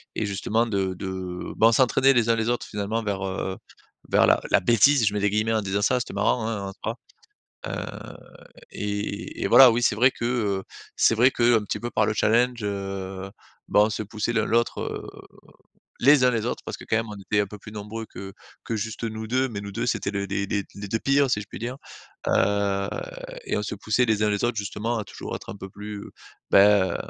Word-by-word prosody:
et 110 - -1
justement, 105 +3 0
de 95 -4 -1
de 95 -1 -5
ben, 115 - +6
on - - +5
s'entraînait 130 +2 +4
les 115 -2 +2
uns 115 - +4
les 115 +1 -1
autres, 120 - -1
finalement, 105 +2 -3
vers, 100 -2 -2
heu, 95 0 -3
heu, - - -10 0.5
vers - - +5
la - - +4
la - - +5
bêtise. 120 +5 +4
Je 100 - +1
mets 105 - -1
des 105 0 +2
guillemets 110 +2 0
en 110 - +1
disant 100 +1 -1
ça, 125 +4 +3
c'était - - -5
marrant, 110 -3 +1
hein, 100 -4 -3
en 95 - -9
soi, 115 +3 -3 0.7
heu - - -6 0.6
et 105 0 -4
et - - +1
voilà, 130 -2 +9
oui, 115 +2 0
c'est 115 - +2
vrai 125 +4 +5
que, 115 - -5
heu, 105 -6 0 0.3
c'est 115 - +4
vrai 125 +4 +5
qu'un 120 -2 +3
petit 105 - -3
peu 120 0 -5
par 110 - +2
le 110 - 0
challenge, 120 +3 +2
heu, 95 -1 -4 0.4
ben, 105 - +5
on 105 - +4
se 110 - -3
poussait 110 +3 -3
l'un 110 -2 +2
l'autre, 120 +1 +1
heu, - - -4 1.0
les 135 0 +6
uns 125 - +4
les 115 -2 -1
autres, 120 - -3
parce - - -5
que, - - -12
quand 110 - 0
même, 115 0 -1
on 105 - -6
était 100 +2 -2
un 100 - 0
peu 105 +2 -10
plus 105 - -11
nombreux 105 +2 -6
que 95 +1 -9 0.3
que 115 - -3
juste 110 +2 -4
nous 110 -1 -4
2. 130 +2 +1
Mais 100 -4 -5
nous 100 - -7
2, - - -2
c'étaient 110 -4 -1
les 100 -1 -3
les 100 +1 -2
les 100 0 -1
les 100 0 -7
2 110 +3 0
pires, 140 0 +2
si 105 - +1
je 105 - -8
puis - - -9
dire, 125 +2 -4 0.5
heu 100 0 +1 0.6
et - - -1
on 105 - -2
se - - -4
poussait 110 +5 +1
les 110 -2 +1
uns 105 - +3
les 105 +1 -1
autres, 120 -1 +1
justement, 110 +3 -2
à - - -3
toujours - - -7
être - - -9
un - - -8
peu 95 - -8
plus, 105 +1 -8 0.5
ben, 100 -3 +5
105 Hz, 235 wpm, -25 LUFS, 100-115 Hz, 1.0 s, voilà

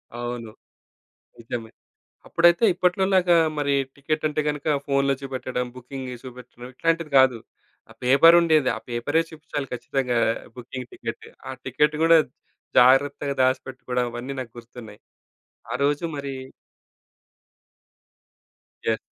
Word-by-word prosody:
అవును. 120 -2 -5 0.9
నిజమే. 115 -1 -6 0.6
అప్పుడైతే 170 +5 +4
ఇప్పట్లోలాగా 185 0 +2 0.2
మరి 140 -1 +1 0.2
టికెట్ 155 +2 -2
అంటే 150 0 -1
గనక 150 -1 -4 0.2
ఫోనులో 140 0 +2
చూపెట్టడం, 130 -2 -3
బుకింగ్ 130 +1 -8
జేసి 125 0 -9
చూపెట్టడం 125 -1 -11
ఇట్లాంటిది 165 +1 -1
కాదు, 130 -3 +4 0.5
ఆ - - -13
పేపరుండేది. 155 +2 +5
ఆ - - -8
పేపరే 120 +7 0
చూపిచ్చాలి 150 -3 -6
ఖచ్చితంగా, 125 0 -1 0.4
బుకింగ్ 125 0 -8
టికెట్. 115 -1 -7 0.2
ఆ - - -3
టికెట్ 150 +4 +1
కూడా 165 0 +7 0.6
జాగ్రత్తగా 140 +3 +4
దాచిపెట్టుకోవడం, 130 -1 -1
అవన్నీ 125 +3 -6
నాకు 125 -3 -6
గుర్తున్నాయి. 115 -3 -13 0.7
ఆరోజు 145 +4 0
మరి 140 -1 -5 2.5
యాహ్! 110 -1 +1
135 Hz, 105 wpm, -24 LUFS, 125-150 Hz, 2.5 s, కూడా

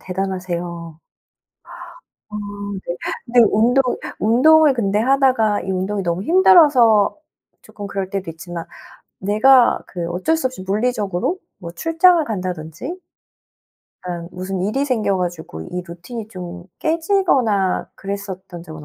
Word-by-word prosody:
대단하세요. 175 -3 -4 1.3
아 210 - -6 0.5
네 175 - -3 0.3
근데 240 +1 +3
운동 240 +5 +3 0.4
운동을 290 +6 +5
근데 205 -4 0
하다가 255 -4 +2
이 190 - -4
운동이 190 +2 -2
너무 170 +1 -2
힘들어서 290 - +5 0.5
쪼끔 205 - -9
그럴 195 -1 -4
때도 195 -3 -4
있지만 165 +1 -8 0.5
내가 235 +6 +4
그 175 -2 -5
어쩔 185 - 0
수 320 - -1
없이 255 -8 -6
물리적으로 205 - -1 0.2
뭐 170 -4 -8
출장을 330 - +3
간다든지 185 - -5 1.0
그러니까 175 -2 -6
무슨 185 +1 -4
일이 240 +8 0
생겨 220 -8 0
가지고 170 - -5
이 180 - -5
루틴이 190 +7 -8
좀 180 -3 -8
깨지거나 315 - +1
그랬었던 195 -3 -7
적은 155 -3 -10
200 Hz, 275 characters per minute, -20 LUFS, 180-255 Hz, 1.3 s, 운동을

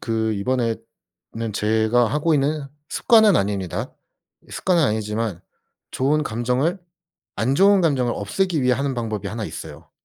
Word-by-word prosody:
그 110 -1 -1
이번에는 115 0 -4
제가 110 +3 +2
하고 150 +5 +1
있는 145 +1 0 0.2
습관은 220 -5 +4
아닙니다. 95 -3 -2 0.6
습관은 175 -3 +1
아니지만 105 - -1 0.5
좋은 150 +4 +1
감정을 125 - -1 0.6
안 125 +5 +1
좋은 200 +3 +5
감정을 130 -8 +1
없애기 155 - -1
위해 125 0 +3
하는 135 +1 -2
방법이 110 -4 -3
1 110 -1 -4
있어요. - - -9
120 Hz, 295 characters per minute, -22 LUFS, 110-150 Hz, 0.6 s, 좋은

